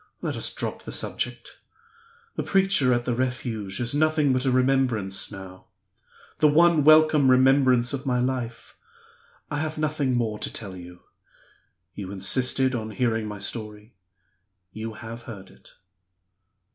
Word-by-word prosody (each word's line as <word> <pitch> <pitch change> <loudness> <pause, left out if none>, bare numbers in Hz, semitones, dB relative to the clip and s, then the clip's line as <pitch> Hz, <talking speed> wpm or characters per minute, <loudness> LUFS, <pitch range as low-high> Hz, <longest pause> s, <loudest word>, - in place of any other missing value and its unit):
Let - - -2
us - - 0
drop - - -5
the - - -9
subject. - - -3 0.8
The - - -2
preacher 190 -9 +2
at 120 0 0
the 125 - 0
Refuge 115 -5 -3
is 120 +1 -1
nothing 155 -2 +2
but 130 +1 -1
a 130 - +2
remembrance 125 -8 0
now 95 -2 -11 0.7
the 155 - +5
one 165 +1 +4
welcome 155 -2 +5
remembrance 130 -1 +4
of 135 -1 -4
my 125 -1 +1
life! 125 -2 -4 0.8
I 145 - -2
have 155 0 -3
nothing 150 -4 -1
more 110 -3 -1
to - - -3
tell 100 -5 -7
you. 90 0 -12 0.9
You 100 -2 -7
insisted 130 +7 +2
on 110 -3 -3
hearing 110 0 -1
my 105 -1 -6
story 105 +2 -6 0.8
you 110 +1 -6
have 115 +1 -9
heard 95 -4 -10
it." - - -19
125 Hz, 145 wpm, -25 LUFS, 110-135 Hz, 0.9 s, the